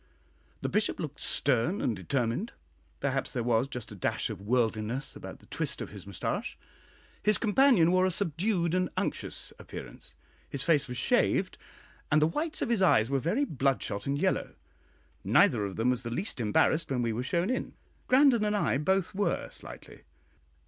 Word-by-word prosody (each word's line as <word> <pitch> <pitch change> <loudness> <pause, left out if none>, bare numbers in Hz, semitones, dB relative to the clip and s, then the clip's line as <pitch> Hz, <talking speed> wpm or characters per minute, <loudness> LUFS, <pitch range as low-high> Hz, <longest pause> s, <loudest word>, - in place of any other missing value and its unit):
The - - -1
Bishop 210 0 0
looked 150 -3 -5
stern 140 - +1
and 115 - 0
determined; 120 - -2 0.5
perhaps 135 -1 -1
there 120 - -2
was 120 +2 +2
just 125 -6 -7
a - - -8
dash 95 - -1
of - - -8
worldliness 115 +3 -1
about - - -9
the - - -21
twist - - -2
of - - -5
his - - -10
mustache. - - -3 0.6
His 210 0 +4
companion 220 -6 +4
wore 185 0 +4
a - - +1
subdued 170 0 0
and 185 -1 +1
unctuous - - -3
appearance; - - -10 0.3
his 140 -2 0
face 150 -4 +2
was 125 -1 -5
shaved; - - +2 0.6
and 150 - +5
the 155 - +4
whites 305 - -1
of 245 - -2
his 230 -5 +1
eyes 120 - +4
were 135 - +2
very 210 - 0
bloodshot 130 - -1
and 140 +1 0
yellow. - - -1 0.7
Neither 110 -4 +4
of 95 - -5
them 120 +3 +2
was 125 -1 -1
the 120 - -5
least 145 - -2
embarrassed 120 +8 +2
when 125 -3 0
we 115 -1 0
were 115 - -2
shown 170 - 0
in; 255 - -3 0.3
Grandon 255 -3 +5
and 210 0 +1
I 140 - +1
both 190 +4 +1
were 200 +1 -1
slightly. - - -11
145 Hz, 175 wpm, -29 LUFS, 120-190 Hz, 0.7 s, and